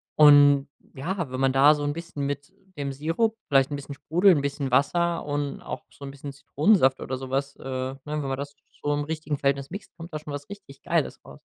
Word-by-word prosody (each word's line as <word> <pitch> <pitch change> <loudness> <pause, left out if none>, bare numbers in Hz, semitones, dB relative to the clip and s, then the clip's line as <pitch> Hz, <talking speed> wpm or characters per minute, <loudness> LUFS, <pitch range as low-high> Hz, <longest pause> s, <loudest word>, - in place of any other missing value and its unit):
und, 145 -2 +7 0.3
ja, 170 +3 -3
wenn 130 - -4
man 135 0 +3
da 145 +3 +6
so 145 - -4
'n 145 0 0
bisschen 165 -3 -5
mit 145 +3 -4 0.3
dem 140 -1 -2
Sirup 165 +11 0
vielleicht 135 -1 +4
’n - - -1
bisschen 140 0 -8
Sprudel, 170 +8 +4
’n 145 -5 +3
bisschen 140 -2 -3
Wasser 170 +5 +2
und 145 -1 -3
auch 125 - -6
so 140 - -14
'n 135 - -6
bisschen 140 0 -8
Zitronensaft 140 0 +3
oder 130 0 -3
so 130 0 -7
was, 140 +1 -1
äh, - - -13
ne, 130 0 -4
wenn 150 0 -2
man 135 -1 -2
das 145 +1 -6 0.3
so 145 - +1
im 145 0 -1
richtigen 155 -2 -3
Verhältnis 140 0 0
mixt, 200 -3 -8
kommt 170 0 -9
da 155 - -3
schon 150 -1 -8
was 145 +3 -7
richtig 200 -9 -11
Geiles - - -1
raus. 70 - -13
145 Hz, 230 wpm, -26 LUFS, 135-155 Hz, 0.3 s, und